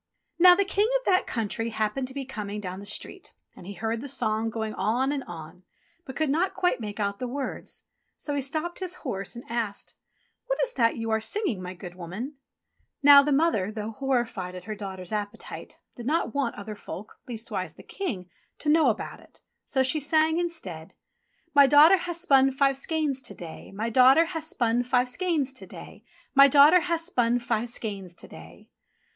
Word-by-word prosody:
Now 360 0 +9
the 400 +2 +1
King 405 +2 +2
of - - -20
that 370 -1 +3
country 225 0 -2
happened 220 +4 -2
to 260 - -10
be 275 -1 -4
coming 210 -5 -5
down 185 -2 -6
the 200 - -9
street, - - -5 0.2
and 175 - -12
he 200 - -6
heard 225 +2 -2
the 285 - -6
song 225 -4 0
going 220 -1 -4
on 240 +7 0
and 280 -2 -2
on, 165 +1 -10 0.4
but 265 - -8
could 310 -3 0
not 345 +6 0
quite 365 -6 +1
make 210 -1 -6
out 200 -1 -1
the 250 - -3
words. 265 +1 -5 0.3
So 290 - -4
he 285 - 0
stopped 315 +6 -3
his 365 -1 -3
horse, 200 -3 -3
and 235 - -9
asked: 225 -4 -3 0.5
"What - - 0
is - - -1
that 230 - +2
you 225 -1 -3
are 220 0 +1
singing, 255 - -2
my 180 0 -6
good 175 -1 -9
woman 190 - -7 0.3
?" - - -46
Now 285 0 +10
the 295 +1 -1
mother, 275 - +2
though 215 0 -5
horrified 235 -8 -2
at 180 - -8
her 215 +3 -5
daughter's 190 -3 -7
ap 210 -1 -1
petite, - - -9 0.2
did 240 0 -7
not 320 +4 0
want 280 -4 -1
other 210 +1 -7
folk, 210 0 -9
leastwise 230 -2 -5
the - - -14
King, 225 - -5 0.3
to 300 - -2
know 305 -3 +5
about 220 - -3
it, - - -17 0.3
so 265 - +2
she 265 +4 +2
sang 315 +3 +2
instead: 195 - -5 0.6
"My 285 -1 +7
daughter 300 +7 +7
ha' 350 0 -4
spun 275 -6 +4
five 275 0 +2
skeins 285 -1 -1
to 255 - -9
day, 165 -2 -9
My 220 +4 -3
daughter 260 +7 +6
ha' 330 -1 -4
spun 240 -6 +1
five 250 0 +1
skeins 295 -2 -1
to 260 - -10
day, - - -12 0.3
My 275 0 +8
daughter 295 +6 +7
ha' 340 0 0
spun 245 -9 +1
five 240 -1 -1
skeins 200 -6 -6
to - - -13
day." 80 +2 -14
250 Hz, 200 wpm, -26 LUFS, 210-295 Hz, 0.6 s, Now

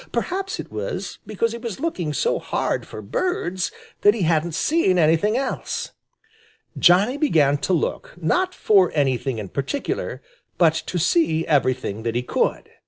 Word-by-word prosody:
Perhaps 385 +2 -2
it - - -7
was - - -4
because 220 +2 0
he 235 - -6
was 230 -5 -5
looking 185 - -2
so 485 - 0
hard - - -2
for - - -8
birds 190 - -1 0.3
that 205 +1 +5
he 210 - -1
hadn't 160 0 +1
seen 190 - +2
anything 170 +7 +3
else. 265 -1 -3 0.8
Johnny 200 +9 +4
began 155 - +3
to 185 - -2
look, 165 - -2
not 360 - +1
for 195 -4 +4
anything 135 -3 0
in 105 -2 -5
particular, 140 - -3 0.4
but 165 -3 +5
to 175 - -4
see 165 -1 +2
everything 130 -7 0
that 115 0 -2
he 120 - 0
could. - - -1
175 Hz, 155 wpm, -22 LUFS, 150-235 Hz, 0.8 s, that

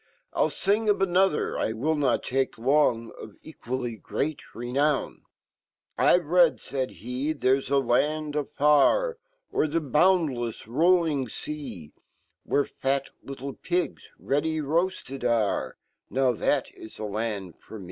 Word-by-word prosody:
Ill - - +3
fing 210 +3 0
of 205 - +4
anofher, 190 -2 +2
't 110 - -1
will 155 +7 +1
not 140 -6 +1
take 135 +1 -1
long; 120 -2 +2
Of 110 - -10
equally 125 -6 -5
great 135 +9 -3
renown 135 +5 -1
2 - - -40 0.4
' - - -55
I've/ 175 -2 +5
read'' 170 +1 +4
fald 130 -2 -3
he 130 +7 -3
/'there's 135 -1 +1
aland 145 +3 +1
afar, 150 - +3 0.3
O'er - - +2
fheboundlefs 150 -5 +1
rolling 155 - +2
fea, 115 - -7 0.5
Where 145 - +1
fat 135 0 -2
little 135 0 -7
pigs 175 +4 -3
ready 160 +3 -1
roarted 155 -3 -1
r 115 -4 0 0.3
,fhath 130 +1 +1
h 110 - -12
land 105 -4 -4
forme. 110 - -11
140 Hz, 125 wpm, -26 LUFS, 120-155 Hz, 0.5 s, I've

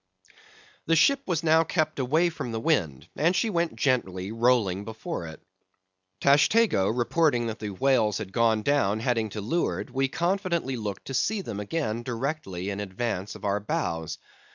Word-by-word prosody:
The 165 - +4
ship 275 - +4
was 170 -2 0
now 160 0 +5
kept 155 -3 -1
away 155 +7 +2
from 125 -7 -5
the 115 - -2
wind, 95 - 0
and 170 +5 +2
she 220 +4 +1
went 170 -2 0
gently 100 -8 0
rolling 115 -5 +2
before 110 - -5
it. 80 - -10 0.8
Tashtego 145 - +4
reporting 125 +2 +1
that 110 -1 -4
the 105 - -4
whales 110 0 +2
had 95 -3 -7
gone 110 -1 +2
down 110 -7 +2
heading 115 -2 0
to 105 +1 -5
leeward, 135 - -1
we 135 +1 +1
confidently 170 -3 -1
looked 105 -5 -5
to 135 - -6
see 200 - 0
them 110 - -6
again 110 0 -2
directly 120 - -3
in 100 - -4
advance 105 0 -3
of 105 -1 -9
our 100 0 +1
bows. 85 - -3
120 Hz, 165 wpm, -26 LUFS, 105-160 Hz, 0.8 s, now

